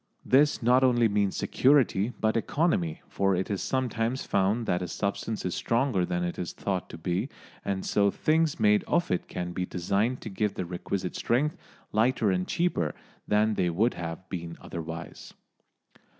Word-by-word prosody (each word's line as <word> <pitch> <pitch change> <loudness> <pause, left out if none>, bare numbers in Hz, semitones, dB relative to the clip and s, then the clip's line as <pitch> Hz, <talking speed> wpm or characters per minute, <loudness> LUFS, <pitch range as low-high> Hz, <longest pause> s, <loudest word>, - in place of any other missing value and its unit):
This 145 0 +4
not 125 +3 +5
only 120 -3 +4
means 100 -2 0
security 125 -6 +3
but 110 0 +1
economy, 115 - 0
for 95 -1 +1
it 95 +3 -2
is 100 - -1
sometimes 125 -1 -1
found 100 +4 +1
that 90 -2 0
a 90 - -3
substance 100 +4 -3
is 90 - -1
stronger 115 -7 +1
than 90 0 -1
it 85 - -3
is 90 - -4
thought 95 -3 -3
to - - -8
be, 90 - -2 0.3
and 95 -1 -2
so 100 -1 +3
things 155 +6 +1
made 105 -1 +4
of 175 - +1
it 90 - -1
can 90 0 -4
be 90 - -2
designed 100 +8 0
to 110 - -6
give 105 +1 -1
the 90 - -3
requisite 90 +1 -4
strength 145 +6 +1 0.4
lighter 110 -1 +2
and 90 0 -1
cheaper 165 - 0 0.3
than 105 +1 +3
they 90 -4 +1
would 105 +9 +2
have 85 +1 -6
been 85 -2 -6
otherwise. 85 +1 -7
100 Hz, 170 wpm, -28 LUFS, 90-120 Hz, 0.4 s, not